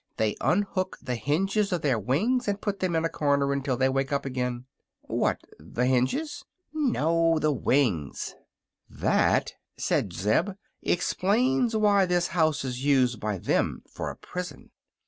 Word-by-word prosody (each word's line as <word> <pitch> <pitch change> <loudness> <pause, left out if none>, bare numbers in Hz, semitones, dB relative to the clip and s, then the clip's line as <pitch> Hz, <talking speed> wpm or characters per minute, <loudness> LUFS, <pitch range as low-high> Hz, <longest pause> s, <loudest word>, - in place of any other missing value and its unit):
they 110 -1 +1
unhook 185 -1 0
the 125 - -4
hinges 195 - 0
of 175 -3 -1
their 130 -6 +2
wings 215 - +1
and 200 0 0
put 200 -2 -3
them 180 -3 0
in 160 0 +1
a - - +3
corner 140 -3 +1
until 135 -2 -1
they 130 +1 +3
wake 135 +1 -1
up 140 -1 -1
again." 125 -2 -3 0.4
"What, - - -1 0.2
the 100 +11 -2
hinges?" 130 - 0 0.3
"No; 165 - +2
the 155 -1 +2
wings." 120 - 0 0.6
"That," - - +1 0.2
said 95 - 0
Zeb, 105 - +1 0.3
"explains 225 +7 +1
why 205 -3 +4
this 175 -1 +1
house 155 -4 +1
is 125 0 -4
used 130 -5 +3
by 105 -2 -2
them - - 0
for - - -5
a - - -7
prison. 180 0 -7
150 Hz, 150 wpm, -27 LUFS, 125-190 Hz, 0.6 s, why